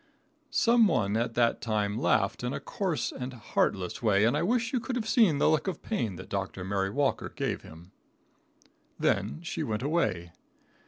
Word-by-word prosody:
] -, -, -42 dB
Some 230 Hz, -1 st, +4 dB
one 105 Hz, -, +1 dB
at 115 Hz, 0 st, -1 dB
that 120 Hz, -1 st, +2 dB
time 105 Hz, -2 st, -1 dB
laughed 110 Hz, -1 st, +1 dB
in 125 Hz, -, -2 dB
a -, -, -3 dB
coarse 175 Hz, -, -2 dB
and 130 Hz, 0 st, -6 dB
heartless 100 Hz, -5 st, -1 dB
way, 105 Hz, -2 st, +3 dB
and 120 Hz, -, +3 dB
I -, -, +1 dB
wish 230 Hz, +6 st, 0 dB
you 255 Hz, -, +2 dB
could 245 Hz, +2 st, -4 dB
have 225 Hz, -3 st, -2 dB
seen 220 Hz, -, +4 dB
the -, -, +3 dB
look 155 Hz, +4 st, +2 dB
of 190 Hz, -, -4 dB
pain 115 Hz, -, -2 dB
that -, -, -9 dB
Dr. 95 Hz, -1 st, -3 dB
Mary 95 Hz, 0 st, -1 dB
Walker 140 Hz, +5 st, 0 dB
gave -, -, -3 dB
him. 85 Hz, +4 st, -14 dB, 1.1 s
Then 110 Hz, -, 0 dB
she 170 Hz, -, -4 dB
went 110 Hz, +2 st, -2 dB
away. 105 Hz, -, 0 dB
120 Hz, 190 wpm, -29 LUFS, -, 1.1 s, Some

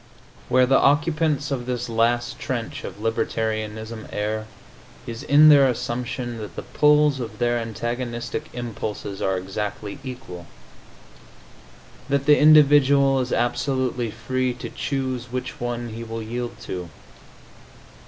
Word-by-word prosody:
Where 130 Hz, 0 st, +5 dB
the 135 Hz, +1 st, +4 dB
occupants 150 Hz, 0 st, +2 dB
of 125 Hz, -3 st, -3 dB
this 125 Hz, -1 st, -2 dB
last 120 Hz, +1 st, 0 dB
trench 120 Hz, -3 st, -4 dB
of -, -, -6 dB
libertarianism 110 Hz, 0 st, -2 dB
err 110 Hz, +1 st, -2 dB, 0.6 s
is 115 Hz, 0 st, -6 dB
in 150 Hz, +1 st, +6 dB
their 140 Hz, -2 st, +7 dB
assumption 120 Hz, 0 st, -3 dB
that 105 Hz, -1 st, -8 dB
the -, -, -5 dB
pulls 150 Hz, -2 st, +3 dB
of 110 Hz, -4 st, -6 dB
their 120 Hz, +1 st, +1 dB
antagonistic 120 Hz, +4 st, -4 dB
impulses 110 Hz, -4 st, -5 dB
are 95 Hz, -1 st, +1 dB
exactly 105 Hz, +4 st, -5 dB
equal 125 Hz, -, -8 dB, 1.6 s
that 140 Hz, 0 st, +1 dB
the 150 Hz, 0 st, +6 dB
individual 140 Hz, -2 st, +6 dB
is 125 Hz, -1 st, -2 dB
absolutely 125 Hz, 0 st, 0 dB
free 125 Hz, +3 st, -2 dB
to 125 Hz, -, -7 dB
choose 130 Hz, -3 st, -3 dB
which 130 Hz, -1 st, -5 dB
one 120 Hz, 0 st, -3 dB
he 115 Hz, +1 st, -7 dB
will 115 Hz, 0 st, -5 dB
yield 120 Hz, +1 st, -5 dB
to. 90 Hz, -6 st, -6 dB
120 Hz, 125 wpm, -23 LUFS, 115-135 Hz, 1.6 s, their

